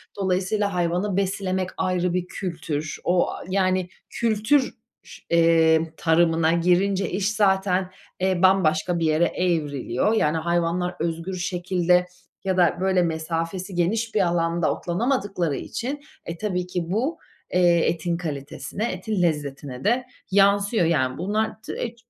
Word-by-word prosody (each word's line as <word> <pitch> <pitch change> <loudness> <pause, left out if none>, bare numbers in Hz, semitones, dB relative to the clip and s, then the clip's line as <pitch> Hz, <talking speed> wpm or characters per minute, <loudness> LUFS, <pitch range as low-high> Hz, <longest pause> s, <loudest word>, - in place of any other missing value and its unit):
Dolayısıyla 195 +1 0
hayvanı 180 +3 0
beslemek 190 -1 -1
ayrı 180 -1 0
bir 180 -1 -1
kültür. 155 -5 -4
O, 175 0 +2
aaa, - - -7
yani, 185 -1 +1 0.2
kültür 235 +4 +1 0.3
ş - - -12
eee, 165 -1 +4
tarımına 165 -1 +3
girince 180 +3 +2
iş 195 +2 0
zaten, 190 -3 +1 0.3
eee, 185 -1 +1
bambaşka 180 -2 +3
bir 165 - 0
yere 155 +2 +3
evriliyor. 155 - 0
Yani, 160 -8 +2
hayvanlar 170 +2 0
özgür 165 +3 -3
şekilde 180 0 +1 0.4
ya 190 -1 0
da 175 -1 +3
böyle 190 -1 +3
mesafesi 165 +3 -3
geniş 220 +7 0
bir 210 - +4
alanda 170 -2 +1
otlanamadıkları 195 - -1
için, 265 - -4 0.3
e, 170 - -5
tabii 180 -2 -2
ki 180 -1 -2
bu, 255 - 0 0.4
eee, 175 -1 +4
etin 170 +1 -1
kalitesine, 160 - -4
etin 185 +2 -2
lezzetine 145 -5 -2
de 240 +5 +1 0.3
yansıyor. 200 0 +3
Yani, 130 -6 +1
bunlar 215 +5 -2
t - - -5
e, 235 -1 -4
180 Hz, 135 wpm, -24 LUFS, 165-195 Hz, 0.4 s, eee